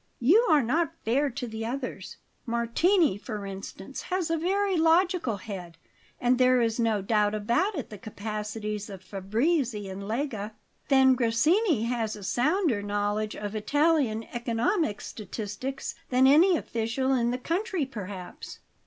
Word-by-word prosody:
"You 375 - +5
are 300 -4 +5
not 325 +7 0
fair 275 +6 +2
to 245 0 -5
the 220 0 -5
others. 255 +3 -5 0.3
Martini, 235 - +2
for 210 -2 -6
instance, 195 +4 -7
has 360 -3 -1
a - - +3
very 390 +3 +1
logical 330 - +2
head, 185 -4 -8 0.4
and 245 +1 +2
there 255 0 +5
is 230 0 0
no 220 -4 +1
doubt 210 0 +2
about 275 - 0
the 210 - -8
capacities 210 0 -5
of 190 -2 -9
Fabrizi 215 - -1
and 190 +1 -6
Lega. 220 -1 -3 0.3
Then 265 -1 +6
Grassini 260 - +2
has 230 -2 -1
a 205 - -10
sounder 255 - +1
knowledge 205 +1 -1
of 205 0 -5
Italian 275 -1 +2
economic 240 - 0
statistics 215 +6 -5 0.2
than 255 +1 +4
any 330 +6 +6
official 235 +2 -1
in 240 -2 +2
the 245 - -1
country, 345 - -1
perhaps." 200 -7 -8
235 Hz, 140 wpm, -27 LUFS, 210-295 Hz, 0.4 s, Then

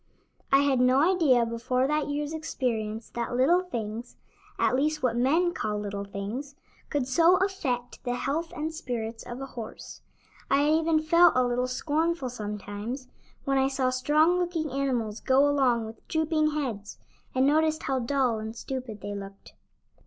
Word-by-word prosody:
I 275 0 +6
had 275 -3 +2
no 265 +8 +4
idea 260 -9 +4
before 245 +3 0
that 300 +1 0
year's 295 +1 -2
experience 230 -8 -3
that 235 0 -3
little 340 +8 +4
things 235 -8 -6 0.4
at - - +2
least 305 +2 0
what 240 -2 +2
men 320 +9 +2
call 210 -8 -2
little 200 -1 -4
things 215 +9 -6 0.3
could 280 -4 -1
so 335 +7 +5
affect 310 -12 -2
the 245 -1 -1
health 310 +6 -2
and 315 +1 -3
spirits 230 -7 -4
of 240 +1 -7
a - - -3
horse. 235 -4 -9 0.5
I 275 - +4
had 300 +1 +3
even 320 0 +2
felt 335 +2 +6
a 255 0 +3
little 245 +1 0
scornful 305 +2 -1
sometimes 210 +3 -6 0.4
when 275 0 +2
I 265 - +3
saw 265 -1 0
strong 305 +7 +3
looking 335 -4 -2
animals 245 -6 -1
go 270 +2 +4
along 255 -5 +2
with 220 +1 -11
drooping 315 -1 +1
heads, 230 -9 -4 0.4
and 260 +1 +3
noticed 315 +2 +2
how 265 -1 0
dull 250 -2 +1
and 220 +1 -6
stupid 250 -3 -6
they 205 +1 -5
looked. 195 0 -9
260 Hz, 165 wpm, -27 LUFS, 235-305 Hz, 0.5 s, I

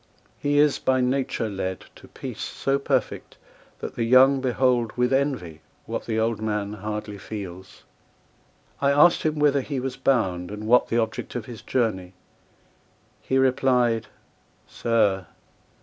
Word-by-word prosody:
He 145 0 0
is 150 0 +4
by 130 0 +1
nature 125 -2 0
led 95 -2 -4
To - - -15
peace - - -8
so 135 0 -1
perfect, 140 - -2 0.4
that - - -5
the 115 - -2
young 130 +3 +5
behold 125 -2 +1
With 125 +1 +2
envy, 130 - -1 0.2
what - - -5
the 110 -1 0
old 110 -1 0
man 105 -1 -2
hardly 105 0 -5
feels. 95 -4 -8 1.0
—I 140 - +3
asked 150 +5 +5
him 155 -1 -1
whither 145 -2 +3
he 135 0 -4
was 130 0 -4
bound, 95 -10 0
and 105 +1 -7
what 125 +3 +4
The 115 - 0
object 110 +1 -2
of 120 -3 -4
his 115 -2 -9
journey; 95 -8 -1 1.1
he 130 - 0
replied 125 -3 +2 0.6
"Sir! 100 -6 0
120 Hz, 145 wpm, -24 LUFS, 105-135 Hz, 1.1 s, young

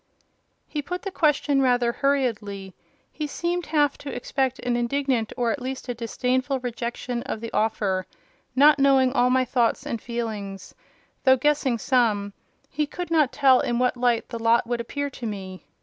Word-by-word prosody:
He 300 - -3
put 360 +5 -5
the 390 - -4
question 295 -4 +2
rather 245 -2 +3
hurriedly; 220 -9 -1 0.4
he 305 - -4
seemed 345 +3 -2
half 295 -2 +1
to 285 - -7
expect 260 +1 -1
an 245 -1 -1
indignant, 240 -1 0
or 240 -2 +1
at 280 - -3
least 260 +1 -5
a - - 0
disdainful 255 +3 -1
rejection 240 0 -4
of 225 - -5
the 230 0 -7
offer: 200 -4 0 0.5
not 290 +2 +6
knowing 270 -2 +4
all 250 -2 +3
my 255 0 +3
thoughts 240 -2 +1
and 230 - -3
feelings, 215 -5 -5 0.5
though 260 -1 +6
guessing 280 -2 +1
some, 215 -5 +1 0.3
he 300 +1 -2
could 355 +2 -6
not 305 -5 +3
tell 265 -3 +5
in 240 - 0
what 250 +1 +2
light 240 -2 +1
the 230 - -5
lot 230 +1 +3
would 240 0 -2
appear 285 +4 -4
to 240 -3 -6
me. 190 -3 -7
250 Hz, 170 wpm, -24 LUFS, 230-280 Hz, 0.5 s, not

